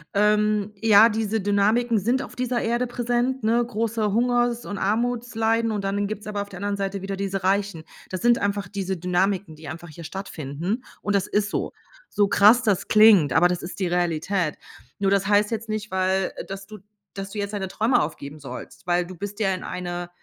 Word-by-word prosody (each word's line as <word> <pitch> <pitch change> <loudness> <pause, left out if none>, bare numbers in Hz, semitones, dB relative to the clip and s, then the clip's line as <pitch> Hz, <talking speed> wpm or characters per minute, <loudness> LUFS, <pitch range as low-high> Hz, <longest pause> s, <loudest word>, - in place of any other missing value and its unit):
ähm, 210 0 +2
ja, 220 0 +7
diese 220 0 -1
Dynamiken 215 +4 +2
sind 245 +7 0
auf - - -10
dieser 250 -1 -1
Erde 240 +2 0
präsent, 245 +1 -1
ne, 230 +2 +3
große 225 -2 -1
Hungers 240 +1 +1
und 200 - -5
Armutsleiden, 230 +1 0
und 210 -2 -2
dann 200 +1 -1
gibt's 215 0 -6
aber 205 -1 -3
auf 200 - -7
der 190 - -9
anderen 205 +1 -2
Seite 195 -1 -3
wieder 195 0 -3
diese 195 -1 -3
Reichen. 195 -3 0 0.3
Das 185 +3 -5
sind 240 0 +4
einfach 200 -2 -1
diese 190 -1 -3
Dynamiken, 180 0 0
die 155 0 -12
einfach 170 +2 -8
hier 165 +2 -10
stattfinden, 180 - -4 0.2
und 205 -1 0
das 195 - +1
ist 205 -1 0
so. - - -2 0.4
So 205 -1 +2
krass 215 +5 +6
das 205 -6 +1
klingt, 210 - +6
aber 175 - +5
das 180 -1 -2
ist 175 +3 -8
die 190 - 0
Realität. 175 -1 0 0.4
Nur 195 -1 +1
das 200 -1 +2
heißt 205 +1 +3
jetzt 225 0 -4
nicht, 215 -1 -4
weil 190 0 0
äh, - - -7
dass 195 0 -7
du 210 0 -11 0.3
dass 195 0 -6
du 215 - -7
jetzt 200 0 -3
deine 195 -2 -2
Träume 220 +6 +2
aufgeben 150 -1 -5
sollst, 135 +5 -10
weil 175 0 +2
du 185 - -9
bist 205 +4 -7
ja 195 -3 +2
in 185 - -5
eine 175 -1 -5
200 Hz, 205 wpm, -24 LUFS, 185-220 Hz, 0.4 s, ja